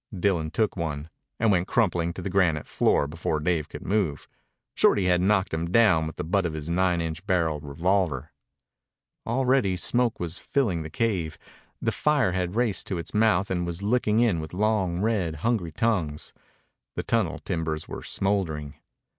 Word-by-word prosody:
Dillon 85 -5 +1
took 105 +7 0
one, 80 -3 -4 0.3
and 115 -1 +3
went 90 -1 +2
crumpling 90 -8 +1
to 90 - -7
the 100 - -2
granite 90 -5 +2
floor - - +2
before 80 0 -2
Dave 80 -1 0
could - - -8
move. 95 -7 0 0.5
Shorty 100 - +3
had 90 -1 +3
knocked 95 -1 +2
him 80 +1 -2
down 90 -6 +4
with 80 - -7
the - - -4
butt 95 +5 +1
of 80 - -5
his 80 +1 -5
nine 90 -1 +2
inch 80 +1 -4
barrel 85 -5 +1
revolver. 80 0 -1 1.0
Already 125 -5 +2
smoke 120 +4 +1
was 85 0 -4
filling 105 -12 0
the 80 - -6
cave. 90 -5 -1 0.4
The - - 0
fire 150 -9 +2
had 90 0 -2
raced 110 -7 0
to 95 - -2
its 85 - -7
mouth 105 -3 +2
and 90 -1 0
was 85 +2 -4
licking 110 0 +2
in 110 -9 +2
with 80 +2 -7
long, 95 -4 +1
red, 100 -7 0
hungry 110 -9 0
tongues. 85 -6 -1 0.6
The - - -2
tunnel - - 0
timbers 80 -2 -3
were - - -6
smouldering. 85 -8 -2
90 Hz, 170 wpm, -26 LUFS, 80-105 Hz, 1.0 s, down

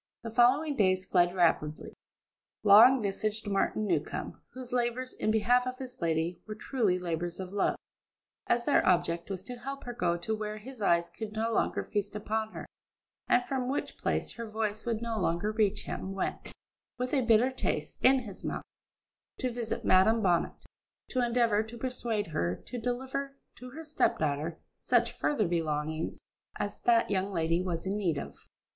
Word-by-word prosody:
The 230 - -5
following 265 +6 +4
days 185 -5 +2
fled 175 -1 +3
rapidly. 160 -4 +1 0.7
Long 225 +5 +8
visaged 215 +2 -2
Martin 205 +2 0
Newcombe, - - -2
whose 255 -1 -7
labours 250 +1 0
in - - -2
behalf 245 +3 +3
of 255 0 -4
his 255 -3 -9
lady 165 +1 0
were 215 - -5
truly 215 -5 0
labours 175 -1 -3
of 185 0 -6
love, 205 - +1 0.7
as 235 0 +2
their 290 - +4
object 170 -1 +1
was 190 -2 -4
to 245 +4 -7
help 275 +3 -6
her 245 - -5
to 175 0 -1
go - - +1
where 215 0 -4
his 240 +2 -10
eyes 170 -3 +3
could 215 -2 -7
no 225 +1 -1
longer - - +1
feast 205 0 -3
upon 220 +1 -2
her, - - -6 0.6
and 245 0 +3
from 255 -2 -2
which 275 - -2
place - - -1
her 230 -2 -7
voice 215 0 -3
would 230 -1 -1
no 230 -2 -2
longer 175 +3 0
reach 215 -2 +1
him, 190 - -5
went, 195 - -3 0.5
with 250 +2 -3
a 275 - +3
bitter 235 +2 +4
taste 260 - -3
in 265 0 +6
his 205 -6 -10
mouth, - - -3 0.7
to 255 -2 -1
visit 235 -1 -4
Madam 215 +5 +5
Bonnet, 175 -3 +2 0.6
to 255 -1 +1
endeavour 235 -3 +3
to 220 +2 -8
persuade 235 -4 -2
her 85 -4 0
to 245 - -5
deliver 265 +3 -3 0.2
to 250 - -10
her 320 +5 -9
step 310 - +1
daughter 155 +2 -2 0.2
such 240 -1 +2
further 220 -10 0
belongings 155 -1 -2 0.4
as 205 0 -4
that 230 -3 +3
young 195 0 0
lady 165 -1 +1
was 175 -2 -3
in 195 +1 -1
need 180 -8 0
of. - - -8
215 Hz, 175 wpm, -30 LUFS, 185-245 Hz, 0.7 s, Long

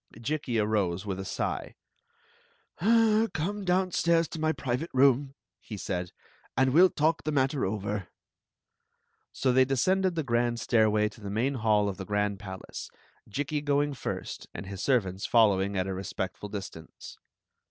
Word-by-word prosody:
Jikki 130 -1 -2
arose 105 -4 0
with 95 -2 -3
a - - -3
sigh. - - -3 0.5
" 470 0 -36
Come 210 -2 +2
downstairs 180 -2 +2
to 160 - -6
my 155 0 +2
private 135 +2 -3
room, 135 +1 +4 0.2
he 105 - -8
said, 90 -2 -3 0.5
"and 130 0 +3
we 160 - +6
11 185 0 +6
talk 155 +2 +1
the 155 - -1
matter 135 -3 +1
over." 100 -2 -3 1.2
So 130 - +1
they 130 +1 +6
descended 185 +8 +1
the 160 - -1
grand 120 -2 0
stairway 110 -2 +3
to 105 - -16
the 100 - -6
main 120 +7 0
hall 110 -4 +2
of 100 - -3
the 95 - -6
grand 105 0 -1
palace, 95 -1 -8 0.4
Jikki 145 +6 -2
going 145 0 +1
first 130 - -5
and - - -6
his 95 -1 -7
servants 100 -8 0
following 100 -4 +3
at 95 - +1
a 95 - -3
respectful 95 +1 -5
distaree. 95 -5 -7
120 Hz, 155 wpm, -28 LUFS, 100-155 Hz, 1.2 s, we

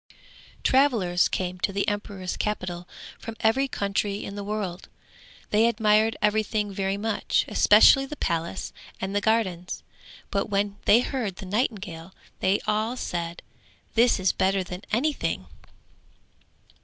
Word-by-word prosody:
Travellers 230 -10 +3
came 185 -1 -3
to 195 - 0
the 200 +1 -1
emperor's 200 -3 -3
capital, 180 -4 -3 0.3
from 225 - -7
every 245 +5 +2
country 200 -3 -2
in 200 - -6
the 205 0 -5
world; 200 -4 -4 0.6
they 220 +2 +4
admired 220 -1 +3
everything 210 -1 +1
very 195 0 -1
much, 220 +1 0
especially 270 -1 +6
the 300 - -6
palace 170 - -2 0.3
and 190 +1 -3
the 205 - +2
gardens, 190 -5 0 0.5
but 200 +1 -1
when 200 0 0
they 230 +4 +6
heard 245 -8 -3
the 195 - -9
nightingale 190 -5 -3 0.2
they 195 +2 +2
all 220 +4 0
said, 170 -5 -4 0.5
'This 235 -1 +4
is 190 0 +3
better 190 0 +1
than 180 +1 -7
anything!' 285 +7 0
205 Hz, 130 wpm, -26 LUFS, 190-220 Hz, 0.6 s, especially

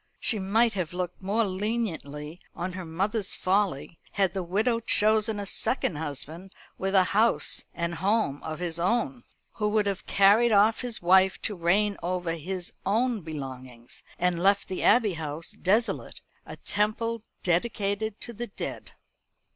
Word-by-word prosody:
She 220 - +1
might 220 +4 +2
have 180 -4 -3
looked 180 0 -4
more 205 +4 +1
leniently 185 -7 -3 0.2
on 180 +2 -4
her 185 -1 -6
mother's 195 +6 0
folly, 185 -5 0
had 195 -3 +1
the 190 - -2
widow 215 +7 +1
chosen 215 -1 +3
a 200 - -4
second 195 - 0
husband 160 +5 -5 0.2
with 195 +1 -2
a 190 - +7
house 225 +3 +2
and 170 0 -3
home 190 -4 0
of 155 -1 -5
his 170 -1 -4
own, 240 +8 0 0.3
who 210 -1 -1
would 210 0 +2
have 200 -2 -3
carried 205 +4 +5
off 215 +2 +4
his 245 -7 -4
wife 190 +2 +5
to 210 - -1
reign 195 +4 +2
over 175 -1 -2
his 180 +3 -5
own 230 +2 +1
belongings, 130 -6 -8 0.2
and 175 -1 0
left 200 +2 +3
the 185 - -3
Abbey 225 -5 +4
House 155 0 -5
desolate 215 +6 -1 0.3
a - - -7
temple 220 +2 -1 0.2
dedicated 200 +3 0
to 235 - -7
the 240 +2 -5
dead. 200 - -7
195 Hz, 155 wpm, -27 LUFS, 170-215 Hz, 0.3 s, a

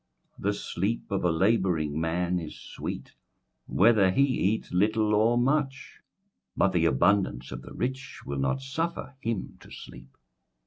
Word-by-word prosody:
21:005:012 - - -12
The 100 - +2
sleep 100 +4 -3
of 100 - 0
a 90 - +3
labouring 80 -5 +1
man 90 +2 0
is 80 -3 -8
sweet, - - -7 0.5
whether 105 -2 +4
he 135 +9 +3
eat 110 -6 0
little 105 +3 +2
or 110 +3 +3
much: 135 +1 0 0.6
but 100 - +3
the 85 -3 +2
abundance 70 -4 +2
of 65 -1 -6
the - - -11
rich 130 +1 -4
will 70 -1 -3
not 70 - 0
suffer 160 +2 -3
him 115 -5 -3
to - - -15
sleep. 65 +1 -12
100 Hz, 150 wpm, -27 LUFS, 80-120 Hz, 0.6 s, whether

